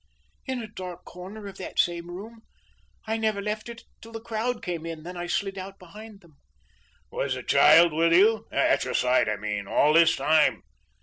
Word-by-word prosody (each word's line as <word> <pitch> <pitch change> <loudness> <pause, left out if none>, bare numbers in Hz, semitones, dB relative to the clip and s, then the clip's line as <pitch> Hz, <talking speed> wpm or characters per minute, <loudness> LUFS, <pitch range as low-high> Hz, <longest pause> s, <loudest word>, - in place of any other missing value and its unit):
"In 260 -1 -2
a - - -7
dark 185 -4 -9
corner 195 +4 -10
of 200 - -9
that 185 - -8
same 170 0 0
room. 220 +6 -9 0.6
I 220 +1 -1
never 220 -2 -1
left 210 +3 -4
it 230 -1 -10 0.2
till 225 - -12
the 225 - -6
crowd 230 +1 -3
came 170 -3 -4
in. 165 -2 -7
Then 180 +2 -8
I 175 0 -5
slid 195 +2 -2
out 195 +1 -8
behind 205 +3 -13
them." 165 -5 -22 0.7
"Was - - -2
the - - -7
child 170 -1 +6
with 165 +2 +2
you 210 +6 +4
at - - +2
your - - -4
side 125 -3 +2
I 110 - 0
mean, 105 -1 -4
all 150 +8 +3
this 165 0 +5
time?" 155 0 +2
185 Hz, 195 wpm, -26 LUFS, 165-220 Hz, 0.7 s, child